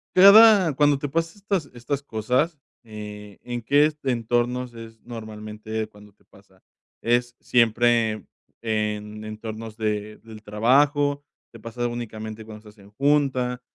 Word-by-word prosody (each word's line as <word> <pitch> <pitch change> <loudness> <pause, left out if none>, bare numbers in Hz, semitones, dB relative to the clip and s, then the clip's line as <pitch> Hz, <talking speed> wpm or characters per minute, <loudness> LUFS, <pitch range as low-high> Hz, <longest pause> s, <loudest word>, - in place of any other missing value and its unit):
Cada 200 -3 +8
cuando 145 0 +3
te 145 - -4
pasa 165 +5 -2
estas 195 -6 -2
estas 130 +4 -4
cosas, 130 +6 -1 0.3
eh, 105 -2 -10
¿en 120 -1 -5
qué 145 +6 +3
entornos 120 0 -1
es 115 -1 -11
normalmente 110 -1 -6
cuando 105 -1 -18
te - - -33
pasa? 95 -1 -23 0.4
¿Es 120 +1 +1
siempre 115 -2 +2 0.4
en 105 -1 -3
entornos 110 +1 -7
de, 105 -1 -3
del 110 -1 -13
trabajo? 145 +7 +2 0.3
¿Te 115 - -12
pasa 115 +2 -5
únicamente 110 -2 -6
cuando 105 0 -12
estás 105 -1 -16
en 100 - -17
junta? 130 0 +1
115 Hz, 130 wpm, -24 LUFS, 110-135 Hz, 0.4 s, Cada